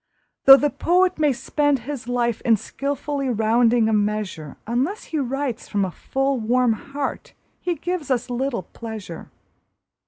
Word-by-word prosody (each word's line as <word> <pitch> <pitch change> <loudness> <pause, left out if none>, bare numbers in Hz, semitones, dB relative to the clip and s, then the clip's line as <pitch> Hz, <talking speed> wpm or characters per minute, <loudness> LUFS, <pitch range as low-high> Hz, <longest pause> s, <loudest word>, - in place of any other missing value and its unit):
Though 270 0 +11
the 290 0 +1
poet 365 0 +2
may 300 -2 +4
spend 285 +3 0
his 275 -4 -6
life 240 -2 0
in 225 -2 +3
skilfully 280 +3 -3
rounding 230 0 +3
a 220 - +1
measure, 205 -8 -2
Unless 270 - -1
he 315 - -3
writes 270 -2 -3
from 200 -2 0
a 185 - -4
full, 270 +6 -1
warm 240 +1 +2
heart 275 +5 -5 0.3
he 350 -1 -2
gives 340 -1 -4
us 250 -2 0
little 245 -4 -2
pleasure. 215 -4 -8
250 Hz, 150 wpm, -22 LUFS, 225-285 Hz, 0.3 s, Though